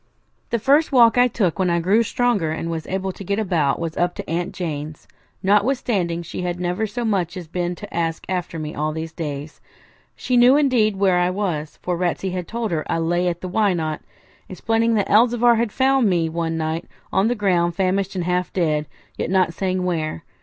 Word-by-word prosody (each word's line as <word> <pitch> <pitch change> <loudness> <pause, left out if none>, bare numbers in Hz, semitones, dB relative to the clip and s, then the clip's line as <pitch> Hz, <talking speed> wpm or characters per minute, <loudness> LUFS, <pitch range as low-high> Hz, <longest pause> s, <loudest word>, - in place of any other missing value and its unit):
The 235 - +1
first 285 +8 +3
walk 235 -4 +6
I 245 0 +5
took 200 -7 -1
when 185 -1 +2
I 170 0 +2
grew 195 +7 +3
stronger 230 -7 0
and 165 +1 -3
was 160 -2 -4
able 190 0 -2
to 195 - -10
get 200 +2 -1
about 170 -10 +1
was 165 -1 -4
up 175 0 0
to - - -7
Aunt 175 +3 -2
Jane's, 155 -4 -5 0.4
notwithstanding 200 -5 +1
she 170 - -6
had 175 0 -3
never 180 +5 -1
so 235 +3 -4
much 185 -4 -1
as 175 -3 -7
been 175 +1 -2
to - - -10
ask 165 -1 -2
after 180 -2 -3
me 155 -1 -5
all 155 +1 -2
these 160 +1 -5
days. 150 -2 -6 0.5
She 250 - 0
knew, 250 +3 +6
indeed, 245 -8 +3
where 190 -2 +3
I 180 0 +2
was, 175 -6 -3
for 180 - -1
Ratsey 180 +2 -1
had 180 -2 -4
told 230 -2 -3
her 155 -2 -1
I - - +1
lay 175 +2 0
at 175 - -2
the 185 - -4
Why 200 +1 +2
Not?, 155 -2 -3 0.5
explaining 225 +5 +1
that 205 - +1
Elzevir 235 +2 +4
had 230 -2 0
found 265 -3 +3
me 170 -3 +1
one 165 0 -2
night 160 +1 -2 0.3
on 190 +3 +3
the 245 - +1
ground 175 -5 +1
famished 190 +1 0
and 180 - -1
half 180 +1 -1
dead, 155 -4 0 0.3
yet - - -1
not 185 -2 +2
saying 185 0 -1
where. 155 - -2
180 Hz, 210 wpm, -21 LUFS, 165-210 Hz, 0.5 s, walk